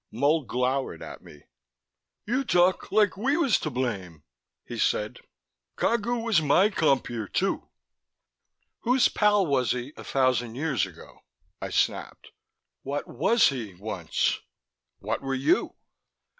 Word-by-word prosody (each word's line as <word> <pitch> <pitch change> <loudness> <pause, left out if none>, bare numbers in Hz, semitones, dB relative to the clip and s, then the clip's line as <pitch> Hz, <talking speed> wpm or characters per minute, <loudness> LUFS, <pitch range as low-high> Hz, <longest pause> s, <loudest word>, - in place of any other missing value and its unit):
Mull 145 +5 +1
glowered 130 +3 -1
at - - -9
me. 75 - -15 0.8
"You 255 +5 0
talk 180 -5 +2
like 210 -2 +3
we 265 - +1
was 275 - +3
to 155 - -3
blame," 100 - -4 0.4
he - - -6
said. 105 0 0 0.6
"Cagu 235 +1 0
was 225 -8 +3
my 155 +7 +4
compeer 130 - 0
too." - - -1 1.1
"Whose 250 +2 +3
pal 210 -2 +3
was 135 -6 +1
he 125 +3 -5
a - - -10
thousand 125 -3 +1
years 135 - 0
ago?" - - -15 0.4
I - - -4
snapped. - - -1 0.5
"What 140 +2 -4
was 225 - +3
he 115 -9 -5
once? 90 -4 -1 0.6
What 110 +3 -3
were 135 -1 -2
you? 130 +2 +1
140 Hz, 130 wpm, -26 LUFS, -, 1.1 s, my